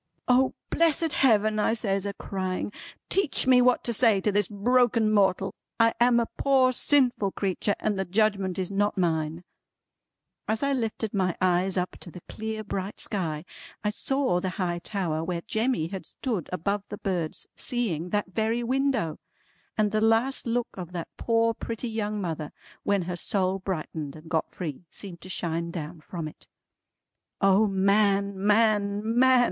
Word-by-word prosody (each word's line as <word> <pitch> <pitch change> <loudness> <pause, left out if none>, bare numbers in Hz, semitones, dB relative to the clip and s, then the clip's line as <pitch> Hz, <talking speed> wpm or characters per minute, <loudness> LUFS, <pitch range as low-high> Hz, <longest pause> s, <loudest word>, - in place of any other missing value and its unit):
"O 255 +1 +4 0.2
blessed 330 -1 +2
Heaven," 215 -4 +3
I 210 - +2
says 200 -3 -1
a 200 - -3
crying, 185 0 -3 0.4
"teach 390 -6 +1
me 255 -1 +6
what 250 0 +3
to 235 - -1
say 225 -3 +4
to 210 - +1
this 205 -1 +2
broken 230 +1 +2
mortal! 195 -2 +2 0.3
I 230 0 +5
am 240 0 +5
a 235 - +1
poor 265 -2 +4
sinful 250 -7 +2
creetur, 200 +1 -1
and 210 -2 -1
the 190 - 0
Judgment 195 -1 +1
is 185 0 -2
not 205 +1 +1
mine." 165 -1 0 1.0
As 220 +4 0
I 280 0 +2
lifted 225 -3 -2
my 185 -4 0
eyes 185 +1 +2
up 180 0 -2
to - - -10
the 175 0 -11
clear 220 0 -4
bright 195 -1 -4
sky, 165 -6 -2 0.4
I 210 - +1
saw 270 -4 +1
the 185 - -2
high 175 -2 -1
tower 170 -5 -2
where 170 0 -2
Jemmy 220 -7 0
had 190 -1 -6
stood 220 - -3
above 200 +3 -1
the 205 - -5
birds, 175 -6 -2
seeing 185 -9 -2
that 205 -1 -1
very 225 +2 0
window; 255 - 0 0.6
and 210 -1 +2
the 215 0 +1
last 225 +4 +2
look 240 +1 0
of 180 -2 -8
that 170 -2 -4
poor 230 0 +2
pretty 230 +1 -5
young 210 -1 -2
mother 160 -5 -3 0.3
when 200 -2 +1
her 175 +1 -3
soul 190 +1 0
brightened 160 -6 -4
and 155 +1 -12
got 160 -2 0
free, 160 -3 -5
seemed 180 -4 -9
to 185 - -10
shine 170 -2 -2
down 165 0 -6
from 165 -1 -5
it. 155 - -12 0.9
"O 195 +2 +4
man, 200 0 +2
man, 205 -1 +3 0.2
man!" 260 0 +6
200 Hz, 165 wpm, -27 LUFS, 180-230 Hz, 1.0 s, me